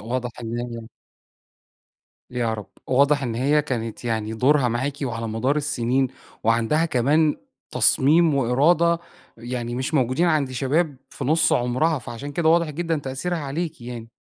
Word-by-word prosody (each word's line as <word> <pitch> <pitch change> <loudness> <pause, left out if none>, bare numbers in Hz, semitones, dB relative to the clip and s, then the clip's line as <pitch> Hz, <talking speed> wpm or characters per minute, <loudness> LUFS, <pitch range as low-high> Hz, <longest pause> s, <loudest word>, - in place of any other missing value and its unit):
واضح 125 +3 -3
إن 115 +1 -4
هي 115 -2 -6 1.4
يا 120 -3 -1
رب. 105 -2 -7 0.2
واضح 140 +2 +3
إن 120 -4 -2
هي 145 +5 +2
كانت 115 -3 -4
يعني 110 -2 -2
دورها 130 +2 +3
معاكِ 130 +5 -1
وعلى 115 -3 -3
مدار 125 +7 0
السِنين 130 -2 0 0.4
وعندها 115 +8 +2
كمان 150 +2 +2 0.3
تصميم 145 +6 +4
وإرادة 155 +7 +3 0.4
يعني 120 0 -4
مش 130 +5 -3
موجودين 130 +5 +2
عند 150 -5 +1
شباب 140 +3 0
في 135 - -6
نُص 155 +3 +3
عُمرها، 130 +6 +1
فعشان 125 +4 -7
كده 160 +1 +1
واضح 170 -1 +3
جدًا 165 +1 -2
تأثيرها 140 +6 -3
عليكِ 155 +2 -4
يعني. 120 -1 -7
130 Hz, 145 wpm, -23 LUFS, 120-150 Hz, 1.4 s, تصميم